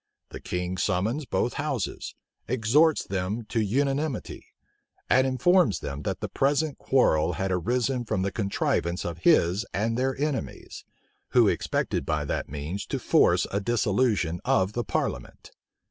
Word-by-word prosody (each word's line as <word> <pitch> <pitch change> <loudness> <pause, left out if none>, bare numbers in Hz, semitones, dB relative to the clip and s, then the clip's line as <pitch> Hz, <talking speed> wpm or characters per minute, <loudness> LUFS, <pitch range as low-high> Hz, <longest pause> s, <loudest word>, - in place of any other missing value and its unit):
The - - -8
king 90 +1 -3
summons 105 +10 0
both 120 - 0
houses; 140 -9 -3 0.3
exhorts 130 +7 +3
them 100 +4 -3
to 115 - 0
unanimity; 135 +6 -1 0.6
and 130 +1 +5
informs 130 - +3
them, 70 0 -6
that - - -3
the - - -2
present 145 +2 0
quarrel 100 -13 +2
had 95 0 -2
arisen 120 +7 0
from 95 -3 -1
the 100 - -1
contrivance 95 -4 -1
of 85 -1 -4
his 85 +4 +3
and 115 +3 0
their 130 +2 -1
enemies, 145 -2 -4 0.5
who - - +6
expected - - -1
by 75 -1 -1
that - - -3
means 75 +8 -5
to - - -2
force - - +3
a 100 - 0
dissolution 105 -5 +1
of 95 +2 +1
the 120 - -1
parliament. 60 - -4
110 Hz, 145 wpm, -26 LUFS, 90-130 Hz, 0.6 s, who